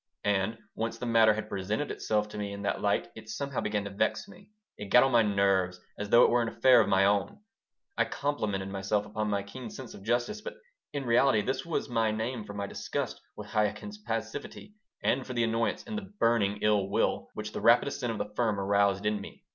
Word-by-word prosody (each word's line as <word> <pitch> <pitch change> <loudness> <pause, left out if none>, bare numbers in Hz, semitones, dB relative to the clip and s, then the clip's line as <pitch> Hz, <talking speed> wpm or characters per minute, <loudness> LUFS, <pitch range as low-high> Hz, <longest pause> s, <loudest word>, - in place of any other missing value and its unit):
And 100 +2 +1 0.2
once 115 0 -3
the 125 - -5
matter 115 -2 +5
had 110 - -4
presented 105 +8 -2
itself 105 -1 0
to 105 - -8
me 100 -1 -3
in 100 0 -7
that 100 - -1
light 100 -3 +1
it 110 -1 -11
somehow 140 +3 -3
began 105 -1 -1
to 100 - -6
vex 100 - 0
me. 200 0 -16 0.3
It 105 - -7
got 125 - +7
on 135 - +2
my 120 -2 +5
nerves, 100 -3 +2 0.2
as 105 0 -5
though 120 +3 +7
it - - +4
were 120 0 +3
an 115 - -1
affair 120 +2 +5
of - - 0
my 95 0 +4
own. 100 -1 +1 0.6
I - - +4
complimented 105 -10 -2
myself 100 +1 -1
upon 105 0 -3
my 100 -1 0
keen 115 +4 -8
sense 130 +2 -9
of - - -11
justice, 120 - -1
but - - -7 0.4
in 140 -2 -4
reality 120 -2 +4
this 130 +8 -2
was 165 - -1
my 115 -3 +1
name 110 +1 -3
for 100 -1 -8
my 100 0 -2
disgust - - -4
with 105 0 -9
Chaikin's 110 - -1
passivity 115 - -5 0.3
and 130 +1 +2
for 130 - -7
the 120 - +2
annoyance 115 0 0
and 225 -3 -5
the 215 - -6
burning 105 -3 +2
ill 105 -2 +2
will - - 0
which 105 0 -5
the - - -5
rapid 120 +4 +5
ascent 125 -4 -2
of 110 - -4
the 105 - -5
firm 110 -3 0
aroused 100 0 +2
in 105 -1 0
me. - - -11
110 Hz, 225 wpm, -29 LUFS, 100-120 Hz, 0.6 s, got